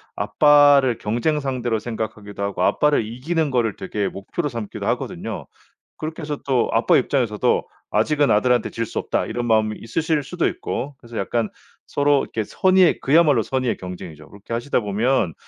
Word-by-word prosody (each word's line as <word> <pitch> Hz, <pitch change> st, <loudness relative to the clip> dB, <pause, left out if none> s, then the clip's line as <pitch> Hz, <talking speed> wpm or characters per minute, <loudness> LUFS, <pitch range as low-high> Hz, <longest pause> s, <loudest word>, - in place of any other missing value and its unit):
아빠를 140 Hz, +2 st, +5 dB
경쟁 120 Hz, +9 st, 0 dB
상대로 125 Hz, -5 st, -1 dB
생각하기도 105 Hz, -3 st, -5 dB
하고 100 Hz, -2 st, -1 dB
아빠를 150 Hz, -7 st, +2 dB
이기는 145 Hz, +7 st, -2 dB
거를 115 Hz, -5 st, +1 dB
되게 100 Hz, +1 st, -2 dB
목표로 145 Hz, -, -4 dB
삼기도 115 Hz, -4 st, -6 dB
하거든요. -, -, -3 dB, 0.5 s
그렇게 160 Hz, +1 st, -6 dB
해서 150 Hz, -1 st, -3 dB
또 130 Hz, -3 st, +1 dB
아빠 115 Hz, -, +4 dB
입장에서도 120 Hz, -5 st, +1 dB, 0.2 s
'아직은 145 Hz, +7 st, +2 dB
아들한테 120 Hz, +3 st, +2 dB
질 115 Hz, 0 st, -2 dB
수 -, -, -8 dB
없다.' -, -, -1 dB
이런 120 Hz, +1 st, -3 dB
마음이 110 Hz, -1 st, +2 dB
있으실 150 Hz, +5 st, -1 dB
수도 175 Hz, +4 st, -1 dB
있고 140 Hz, +1 st, -4 dB
그래서 120 Hz, -2 st, -10 dB
약간 110 Hz, +3 st, -1 dB, 0.4 s
서로 145 Hz, -1 st, +2 dB
이렇게 110 Hz, -, -3 dB
선의의 185 Hz, -, +3 dB
그야말로 145 Hz, -4 st, +4 dB
선의의 130 Hz, -1 st, -1 dB
경쟁이죠. 85 Hz, -4 st, -9 dB
그렇게 100 Hz, +3 st, -9 dB
하시다 120 Hz, +4 st, 0 dB
보면 105 Hz, -2 st, 0 dB
120 Hz, 400 characters per minute, -22 LUFS, 110-145 Hz, 0.5 s, 아빠를